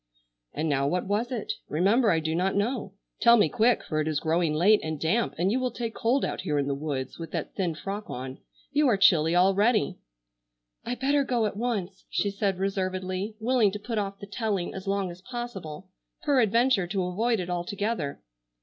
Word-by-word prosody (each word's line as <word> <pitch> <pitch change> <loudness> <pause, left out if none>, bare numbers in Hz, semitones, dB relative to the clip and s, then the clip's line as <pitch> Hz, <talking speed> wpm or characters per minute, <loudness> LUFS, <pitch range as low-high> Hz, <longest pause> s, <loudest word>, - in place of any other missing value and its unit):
"And 155 +2 -2
now 140 -2 +1
what 180 +4 0
was 210 +5 -1
it? 235 -4 -2 0.2
Remember 205 - +3
I 165 - +3
do 160 0 -2
not 185 +3 0
know. 205 -1 -1 0.3
Tell 235 0 +7
me 205 -8 +4
quick, 230 +6 +2
for 155 -1 -1
it 155 - -2
is 155 -2 0
growing 165 0 +1
late 205 +7 +5
and 155 -1 -4
damp, 185 +10 0
and 180 +4 +1
you 250 - +1
will 255 -1 0
take 230 -2 -4
cold 245 +5 +1
out - - -3
here 150 -6 -1
in 140 - +1
the 140 - -1
woods 140 -2 -4
with 165 - -6
that 165 -3 -3
thin 175 -4 -1
frock 200 +5 -5
on. 130 +1 -6 0.3
You 290 +1 +3
are 225 -5 +3
chilly 170 -4 +4
already." 195 +2 +3 0.8
"I 245 - -3
better 280 +3 +2
go 240 -4 +1
at 210 - -2
once," 205 -5 -3
she 200 - 0
said 200 -2 -1
reservedly, 185 +1 -2
willing 230 -3 +3
to - - -2
put 220 +1 -3
off 200 -1 -3
the 200 - -9
telling 200 -3 -2
as 190 +1 -7
long 195 -2 0
as 175 +1 -12
possible, 195 -8 -7 0.3
peradventure 240 - +3
to 190 +1 -1
avoid 220 +6 0
it 180 -1 -3
altogether. 180 -3 -2
195 Hz, 200 wpm, -27 LUFS, 175-230 Hz, 0.8 s, Tell